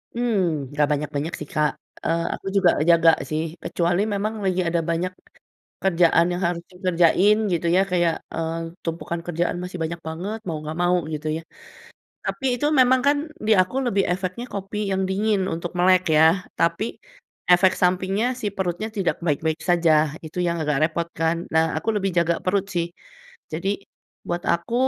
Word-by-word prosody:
Mmm, 185 - 0
nggak 145 0 +2
banyak-banyak 150 +2 -2
sih, - - -7
Kak, 150 -1 +2 0.3
eee, 165 0 +1
aku - - -8
juga 185 -3 +5 0.2
jaga 165 -1 +6 0.2
sih, 155 0 -1 0.2
kecuali 175 +2 0
memang 205 +2 -1
lagi 185 -1 +1
ada 170 0 +1
banyak 170 +2 0 0.7
kerjaan 170 -2 +4
yang 175 +2 -3
harus 170 -1 -2
dikerjain 180 +2 +3 0.2
gitu 170 -1 0
ya, 190 - +5
kayak, 175 -2 +2 0.2
eee, 165 0 -2 0.3
tumpukan 165 0 -3
kerjaan 175 0 -1
masih 180 0 -6
banyak 165 +1 -3
banget, 185 +7 -4
mau 165 - -2
nggak 155 +1 -5
mau 175 +1 +3 0.2
gitu 155 +1 -6
ya. 165 - -5 0.8
Tapi 270 - -4 0.2
itu 295 - +2
memang 255 0 +5
kan, 285 +1 +5 0.3
di 220 - +4
aku 185 +8 -6
lebih 200 -5 +2
efeknya 185 +5 -3
kopi 200 +1 -5
yang 190 0 0
dingin 205 +1 +1
untuk 170 +1 -5
melek 185 +1 +5
ya, 155 - +7 0.3
tapi 170 +5 +1 0.7
efek 185 +1 +5
sampingnya 185 +4 +2
si 215 - -3
perutnya 190 +3 -2
tidak 190 -4 0
baik-baik 160 +1 0
saja, 170 -2 +3 0.3
itu 160 +3 -7
yang 170 0 0
agak 150 -2 0
repot 165 +1 -1
kan. 165 +1 +2 0.2
Nah, 160 0 +5
aku 195 - -7
lebih 195 -1 0
jaga 170 0 +3
perut 190 +1 +1
sih, 170 -1 +1 0.7
jadi 170 +5 -2 0.6
buat 175 0 -2
aku, 170 +7 -2
175 Hz, 165 wpm, -23 LUFS, 165-190 Hz, 0.8 s, ya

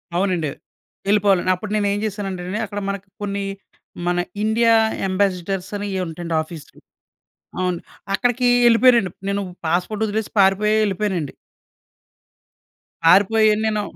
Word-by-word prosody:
అవునండి. 180 -4 0 0.6
వెళ్ళిపోవాలి. 200 -2 +3
అప్పుడు 205 +3 -7
నేనేం 205 -1 +1
చేశానంటే 195 -3 -4
అండి! 200 +4 -3
అక్కడ 205 0 -5
మనకి 200 0 -5
కొన్ని 200 -1 -2 0.6
మన 175 0 +1 0.3
ఇండియా 230 +1 +3 0.4
అంబాసీడర్స్ 185 -1 -1
అని 205 0 -3
ఏవో 185 - -1
ఉంటాయండి 165 0 -4
ఆఫీస్‌లు. 160 -1 -11 0.8
అవును. 180 -2 -1 0.3
అక్కడికి 245 +2 +1 0.2
వెళ్ళిపోయానండి. 235 -4 +5 0.2
నేను 200 0 -1 0.3
పాస్‌పోర్ట్ 180 +6 0
వదిలేసి 215 0 -2
పారిపోయి 200 +2 +4
వెళ్ళిపోయానండి. 190 -7 -2 1.7
పారిపోయి 210 +5 +5
నేను 215 -1 0
200 Hz, 110 wpm, -21 LUFS, 180-215 Hz, 1.7 s, వెళ్ళిపోయానండి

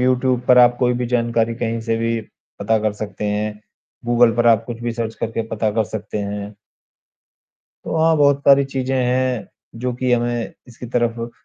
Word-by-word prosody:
YouTube 125 0 +2
पर 125 - +7
आप 120 0 +6
कोई 125 -1 +2
भी - - -1
जानकारी 115 -1 0
कहीं 115 -1 -2
से 115 0 -1
भी 115 0 -1 0.4
पता 110 0 +2
कर 110 -1 0
सकते 105 0 -6
हैं। 105 0 -2 0.4
गूगल 120 0 +4
पर 120 0 +2
आप 115 -1 +4
कुछ 115 -1 -6
भी 120 0 -2
सर्च 115 -1 -4
करके 115 0 -2
पता 110 -1 -1
कर 110 -1 +2
सकते 105 0 -5
हैं। 100 0 -5 1.3
तो - - -3
हाँ, 160 0 +3
बहुत 140 -1 +3
पारी 140 0 +6
चीज़ें 135 -1 -3
हैं, 125 -1 0 0.3
जो 125 +2 -3
कि 125 0 0
हमें 120 -1 -1 0.2
इसकी 125 +1 -10
तरफ 120 -1 -1
120 Hz, 185 wpm, -20 LUFS, 115-125 Hz, 1.3 s, पर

